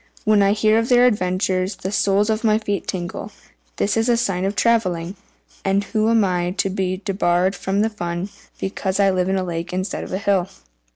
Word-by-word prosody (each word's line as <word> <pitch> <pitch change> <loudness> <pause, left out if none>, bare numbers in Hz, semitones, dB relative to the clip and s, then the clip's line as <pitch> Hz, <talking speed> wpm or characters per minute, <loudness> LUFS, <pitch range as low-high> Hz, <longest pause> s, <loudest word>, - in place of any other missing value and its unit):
When 215 -1 +4
I 200 0 +4
hear 215 +1 +3
of 230 - -2
their 245 0 +6
adventures, 185 -3 0
the 190 - -5
soles 205 +1 +2
of 220 +1 -2
my 215 -1 +4
feet 205 -2 -3
tingle. 185 +3 -5 0.4
This 205 - 0
is 225 +2 +1
a 235 - +4
sign 195 -5 -1
of 200 +1 -1
travelling, 190 -7 +1 0.5
and 195 +1 +1
am 220 0 +3
I 180 -1 -1
to 195 - 0
be 185 0 -2
debarred 185 -1 +1
from 200 +3 0
fun 175 -3 -4 0.3
because 190 0 -2
I 195 -1 +4
live 185 0 0
in 190 - +1
a 190 - -1
lake 170 -1 -4
instead 185 +2 -3
of - - -8
a 185 - -1
hill?" 195 -2 +1
195 Hz, 195 wpm, -21 LUFS, 185-215 Hz, 0.5 s, their